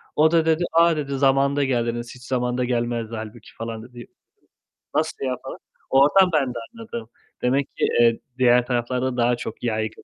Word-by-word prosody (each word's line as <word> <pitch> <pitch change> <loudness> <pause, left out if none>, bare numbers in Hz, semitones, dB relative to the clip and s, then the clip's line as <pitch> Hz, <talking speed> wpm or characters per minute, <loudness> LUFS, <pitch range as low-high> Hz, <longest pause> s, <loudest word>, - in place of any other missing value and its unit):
O 155 +1 +4
da 165 -1 +3
dedi 160 +1 +2
"A!" 165 0 +5
dedi. 140 -2 -3
"Zamanında 140 +1 +3
geldiniz, 120 -2 -2
hiç 125 - -15
zamanında 125 -1 -1
gelmezdi 120 -2 -2
hâlbuki." 110 +1 -9
falan 115 -1 -5
dedi. 120 -1 -11 0.9
"Nasıl 155 -3 -1
ya?" 130 -1 -1
falan. - - -7 0.3
Oradan 150 +8 +5
ben 135 -5 +1
de - - -6 0.2
anladım. 220 - -8 0.3
Demek 135 +2 0
ki, - - +2 0.2
eee, 115 -1 +4 0.2
diğer 125 -1 +4
taraflarda 125 +1 -1
daha 120 0 +3
çok 115 - -7
yaygın. 110 -2 -2
125 Hz, 165 wpm, -23 LUFS, 120-140 Hz, 0.9 s, A